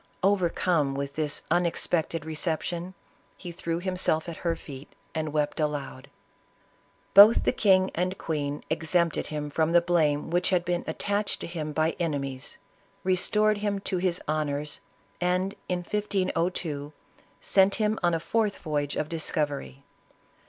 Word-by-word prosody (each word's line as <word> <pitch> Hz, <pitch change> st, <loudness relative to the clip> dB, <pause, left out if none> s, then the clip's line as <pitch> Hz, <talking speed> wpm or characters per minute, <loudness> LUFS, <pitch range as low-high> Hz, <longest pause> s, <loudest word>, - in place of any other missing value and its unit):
Over 190 Hz, -3 st, +3 dB
come 155 Hz, -7 st, +1 dB
with 140 Hz, 0 st, -3 dB
this 150 Hz, -2 st, -2 dB
unexpected 170 Hz, -2 st, 0 dB
reception, 170 Hz, +3 st, -3 dB, 0.4 s
he 175 Hz, -, -7 dB
threw 170 Hz, 0 st, -3 dB
himself 180 Hz, -3 st, 0 dB
at 170 Hz, -, -6 dB
her 170 Hz, -1 st, -1 dB
feet 140 Hz, -3 st, -10 dB, 0.2 s
and 155 Hz, -1 st, -2 dB
wept 150 Hz, 0 st, -1 dB
aloud. 140 Hz, -3 st, -3 dB, 1.0 s
B< 200 Hz, -, +12 dB
til 215 Hz, +3 st, +9 dB
the -, -, +1 dB
king 190 Hz, -2 st, +3 dB
and 185 Hz, +2 st, -1 dB
queen 145 Hz, -2 st, -3 dB
exempted 170 Hz, +1 st, +1 dB
him 150 Hz, -1 st, -4 dB
from 160 Hz, +2 st, +1 dB
the 175 Hz, -, +8 dB
blame 160 Hz, -4 st, +1 dB
which 175 Hz, +1 st, +2 dB
had 180 Hz, -2 st, +2 dB
been 175 Hz, 0 st, -1 dB
attached 205 Hz, +6 st, -1 dB
to -, -, -4 dB
him 160 Hz, -3 st, -4 dB
by 155 Hz, +2 st, +1 dB
enemies, 140 Hz, -6 st, -3 dB, 0.5 s
re 185 Hz, 0 st, +3 dB
stored 210 Hz, +3 st, +2 dB
him 205 Hz, -1 st, -1 dB
to 190 Hz, -, -2 dB
his 180 Hz, -1 st, 0 dB
honors, 150 Hz, -1 st, -2 dB, 0.4 s
and, 180 Hz, +2 st, +1 dB, 0.2 s
in 180 Hz, -1 st, 0 dB
1502, 175 Hz, -7 st, -1 dB, 0.5 s
sent 195 Hz, 0 st, +4 dB
him 215 Hz, 0 st, 0 dB
on 175 Hz, -1 st, +2 dB
a -, -, -1 dB
fourth 215 Hz, +4 st, 0 dB
voyage 145 Hz, -3 st, -2 dB
o£ 150 Hz, -, -1 dB
discovery. 145 Hz, -, -2 dB
170 Hz, 150 wpm, -27 LUFS, 150-185 Hz, 1.0 s, B<